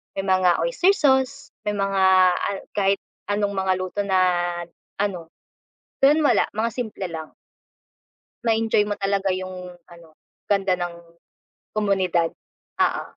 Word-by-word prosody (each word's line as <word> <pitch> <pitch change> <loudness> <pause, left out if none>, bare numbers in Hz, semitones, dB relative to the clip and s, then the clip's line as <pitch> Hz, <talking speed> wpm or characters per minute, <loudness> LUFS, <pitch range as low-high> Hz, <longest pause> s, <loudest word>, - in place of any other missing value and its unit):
may 195 - -2
mga 185 -2 +3
oyster 400 -6 +3
sauce, 275 -1 +1 0.2
may 210 - 0
mga 190 -2 +4 0.4
kahit 195 -1 +1 0.3
anong 205 0 0
mga 190 0 +2
luto 185 +2 -5
na 190 -1 +3 0.8
ano, 185 -5 -2 0.7
doon 290 +3 +5
wala - - +3
mga 225 +2 0
simple 215 -6 -4
lang. 160 -1 -7 1.1
Ma-enjoy 225 -2 +2
mo 205 - -3
talaga 195 -1 +1
yung 185 -1 -6 0.2
ano 170 -1 -15 0.4
ganda 195 -3 +1
ng 175 -1 -4 0.8
komunidad, 190 -5 +1 0.6
oo. - - 0
195 Hz, 120 wpm, -23 LUFS, 185-215 Hz, 1.1 s, doon